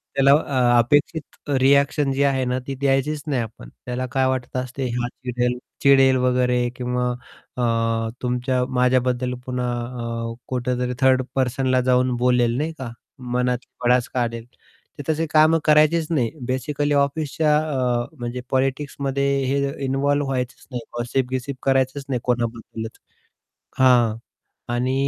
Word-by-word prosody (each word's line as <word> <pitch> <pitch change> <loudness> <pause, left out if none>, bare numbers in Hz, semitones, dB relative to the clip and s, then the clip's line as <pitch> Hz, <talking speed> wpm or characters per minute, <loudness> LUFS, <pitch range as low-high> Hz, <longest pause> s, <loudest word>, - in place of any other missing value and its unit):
त्याला 135 0 +5
अ 130 -5 +3
अपेक्षित 145 +6 +2 0.4
रिएक्शन 140 +1 +3
जी 135 +1 +1
आहे 135 -2 +2
ना, 125 +1 0
ती 135 - -3
द्यायचीच 140 +2 0
नाही 135 -5 0
आपण. 110 - -8 0.2
त्याला 125 +1 -3
काय 135 -1 +2
वाटतं 130 -1 -2
असते 130 +1 -4
"हा" 120 0 -1 0.2
"चिडेल 125 0 -1 0.3
चिडेल 135 -1 +6
वगैरे 125 -1 +2
किंवा 125 0 -1 0.5
अ, 115 -1 0
तुमच्या 125 +1 0
माझ्याबद्दल 125 0 +2
पुन्हा 125 -1 -2 0.6
अ, - - -5
कुठेतरी 125 0 -1
थर्ड 130 -1 +4
पर्सनला 130 0 +1
जाऊन 125 0 +2
बोलेल 125 -1 +3
नाही 155 +3 -2
का, 125 -3 -5 0.3
मनातली 125 0 -2
भडास 125 0 +3
काढेल." 115 -2 -2 0.5
ते 145 - -6
तसे 160 +1 +1
कामं 155 +1 +5
करायचीच 155 +1 +4
नाही 125 -8 +1 0.2
बेसिकली 145 +3 -1
ऑफिसच्या 150 +2 +1
अ, 130 -6 0
म्हणजे 120 +1 -4
पॉलिटिक्समध्ये 135 +1 -1 0.2
हे 135 +2 +1 0.3
इन्व्हॉल्व 140 +2 +1
व्हायचंच 130 -1 -3
नाही. 125 -1 -4 0.2
गॉसिप-बिसिप 130 +2 -2
करायचंच 135 +1 +1
नाही 125 -2 0
कोणाबद्दलच. 115 -2 -3 0.8
हां. 120 -4 +4 0.6
आणि 125 +2 0
130 Hz, 130 wpm, -22 LUFS, 125-140 Hz, 0.8 s, चिडेल